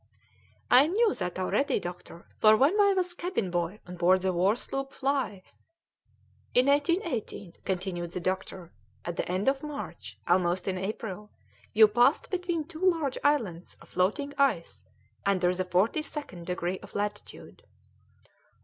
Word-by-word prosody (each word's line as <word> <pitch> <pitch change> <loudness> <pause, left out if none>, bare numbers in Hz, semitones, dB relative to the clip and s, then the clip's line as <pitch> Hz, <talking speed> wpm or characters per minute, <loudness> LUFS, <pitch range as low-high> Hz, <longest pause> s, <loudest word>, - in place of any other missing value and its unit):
"I 260 +4 +7
knew 425 +5 +2
that 180 -1 -4
already, 260 +9 +1
doctor, 175 -2 -9
for 215 0 +6
when 300 - +3
I 400 -1 +4
was 360 -1 -1
cabinboy 200 - -2
on 180 0 -9
board 180 +2 +3
the 190 -1 +1
war 185 +5 +3
sloop 270 +2 -5
Fly 270 -8 -1 0.5
" - - -37
"In 250 - +5
1818," 285 - 0
continued 180 -2 -3
the 180 - -5
doctor, 185 -1 -4 0.3
"at 175 - -3
the - - -3
end 185 +5 -1
of 270 0 +2
March, 300 -2 -7
almost 180 +1 +2
in 185 -1 -1
April, 210 +1 -5 0.4
you 220 0 +7
passed 240 +7 +2
between 355 -3 -1
two 320 +1 -11
large 325 -8 +1
islands 215 - 0
of - - -17
floating 215 +11 0
ice 235 -12 0 0.4
under 185 -2 +2
the 185 0 -2
forty 185 - +1
second 285 - -7
degree 180 0 -2
of - - -14
latitude." 205 0 -5
210 Hz, 150 wpm, -28 LUFS, 180-285 Hz, 0.5 s, I